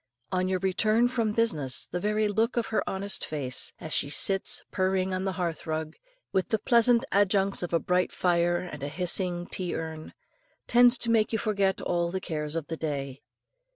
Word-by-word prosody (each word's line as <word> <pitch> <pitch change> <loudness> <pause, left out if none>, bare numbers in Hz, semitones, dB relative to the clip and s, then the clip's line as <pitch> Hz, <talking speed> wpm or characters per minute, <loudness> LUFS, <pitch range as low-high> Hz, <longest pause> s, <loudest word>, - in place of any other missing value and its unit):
On 185 0 0
your 185 0 +1
return 215 +5 +2
from 235 -3 0
business, 155 - +1
the 180 - -4
very 210 +2 +1
look 225 +4 0
of 235 - +1
her - - +2
honest 195 +1 -2
face, 135 -5 -1
as 155 - -5
she 140 - +1
sits 195 +6 +2
purring 190 0 0
on 185 +1 -2
the 190 - -1
hearth 175 -3 -3
rug, 155 0 -3 0.4
with 190 -2 0
the 220 - +2
pleasant 235 +2 +3
adjuncts 195 0 +2
of 175 - -4
a 170 - +3
bright 180 +2 0
fire 175 -1 +1
and 160 -5 -7
hissing 175 +4 -1
tea 180 -1 -4
urn, 160 -1 -6 0.5
tends 245 +1 +5
to 230 - -2
make 220 -2 +3
you 225 - +1
forget 200 -3 0
all 170 -1 0
the 190 +2 -3
cares 150 -3 -4
of 165 -3 -2
the 165 - -5
day. 140 -4 -4
185 Hz, 190 wpm, -27 LUFS, 165-210 Hz, 0.5 s, tends